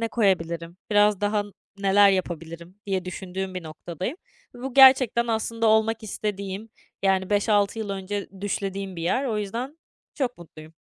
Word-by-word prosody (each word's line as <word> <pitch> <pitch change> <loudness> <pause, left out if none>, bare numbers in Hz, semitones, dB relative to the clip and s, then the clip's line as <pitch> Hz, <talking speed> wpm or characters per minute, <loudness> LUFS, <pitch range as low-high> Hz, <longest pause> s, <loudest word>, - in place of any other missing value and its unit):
ne 230 - 0
koyabilirim, 170 -6 0
biraz 205 -1 +4
daha 205 0 +1 0.3
neler 200 0 +5
yapabilirim 170 -1 -4
diye 190 -2 -1
düşündüğüm 185 +1 -5
bir 185 - -4
noktadayım 170 - -6 0.4
ve 245 - -11
bu 265 -1 -5
gerçekten 260 -3 +7
aslında 230 0 -1
olmak 220 +1 +3
istediğim, 200 0 -4 0.3
yani, 190 -1 +1
5-6 205 0 +2
yıl 215 -2 -3
önce 195 +1 -4
düşlediğim 195 -1 -3
bir 165 - -5
yer. 255 +11 +1
O 220 -5 -1
yüzden 240 +9 -4 0.4
çok 250 - -2
mutluyum. 160 -2 -13
200 Hz, 150 wpm, -25 LUFS, 185-220 Hz, 0.4 s, gerçekten